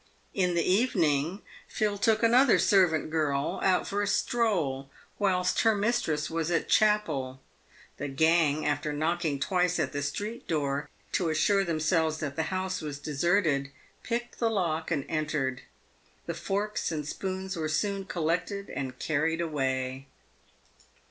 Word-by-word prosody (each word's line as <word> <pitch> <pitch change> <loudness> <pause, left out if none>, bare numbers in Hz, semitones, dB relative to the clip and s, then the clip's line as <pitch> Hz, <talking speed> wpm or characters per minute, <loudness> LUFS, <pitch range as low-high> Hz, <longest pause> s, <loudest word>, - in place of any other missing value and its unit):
In 180 -3 +1
the 170 - +2
evening, 180 - +1 0.2
Phil 210 -1 -1
took 220 +1 +2
another 245 +3 +5
servant 175 -6 +3
girl 155 +1 0
out 185 -2 +2
for 205 +1 -1
a 205 - 0
stroll, 175 - 0 0.3
whilst 185 -3 +2
her 225 -1 +4
mistress 200 -8 0
was 165 0 -2
at 170 -1 0
chapel. 155 -12 +2 0.6
The 145 - -4
gang, 155 +1 +2
after 150 +1 -1
knocking 155 -1 -1
twice 180 +3 +1
at - - 0
the 145 - -2
street 205 +11 -4
door 145 -2 -1 0.2
to 175 -3 0
assure 195 +6 +2
themselves 160 -1 +1
that 140 -2 -4
the 160 -1 -1
house 185 -1 -2
was 150 -2 -5
deserted, 150 -1 +1 0.3
picked 240 0 -4
the 230 - +2
lock 165 -7 -1
and 150 -5 -1
entered. 150 -5 -1 0.6
The 170 - -3
forks 200 +5 -2
and 150 -2 -3
spoons 190 +2 -4
were 155 -2 -2
soon 195 +4 -1
col 175 -4 -4
lected 180 +5 -1
and 130 -2 -4
carried 160 +4 0
away. 135 -4 -2
165 Hz, 145 wpm, -28 LUFS, 150-195 Hz, 0.6 s, another